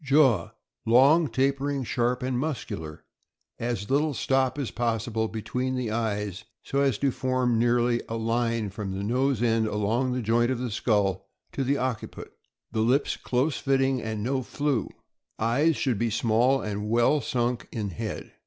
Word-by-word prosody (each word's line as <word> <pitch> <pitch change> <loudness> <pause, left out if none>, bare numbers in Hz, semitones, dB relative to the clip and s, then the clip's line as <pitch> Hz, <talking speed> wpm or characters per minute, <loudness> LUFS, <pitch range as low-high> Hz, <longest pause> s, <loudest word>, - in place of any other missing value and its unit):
Jaw. 135 - +4 0.2
— - - -57
Long, 155 +5 +6
tapering, 140 +1 0
sharp, 125 +1 0
and 125 -1 -1
muscular; 105 - -4 0.6
as 115 -2 -3
little 145 +1 +2
stop 130 +1 +1
as 140 -5 -3
possible 115 -1 -1
between 125 +4 -3
the 125 -4 -2
eyes, 105 -3 -2 0.2
so 140 - -1
as 135 -6 +2
to 140 -1 +1
form 130 -2 0
nearly 120 0 +2
a 115 - -3
line 115 -2 0
from 100 -1 -5
the 100 - -3
nose 125 +2 +1
end 115 -1 +2
along 110 +5 0
the 125 -1 -2
joint 120 +2 +2
of 130 - 0
the 125 -1 -3
skull 100 -3 0 0.2
to 135 - -2
the 140 +2 +1
occiput. 125 -4 -4 0.4
The 110 - -2
lips 130 +6 +2
close 130 +4 -1
fitting, 135 -2 +1
and 110 -2 -4
no 130 +3 0
flew. 140 -3 -1 0.5
Eyes. 140 +9 +2
— - - -6
Should 125 -7 0
be 115 - +1
small 120 +4 +2
and 105 0 -3
well 120 +6 +3
sunk 125 -4 -1
in 105 -4 -3
head. 80 - -6
120 Hz, 170 wpm, -26 LUFS, 110-135 Hz, 0.6 s, Long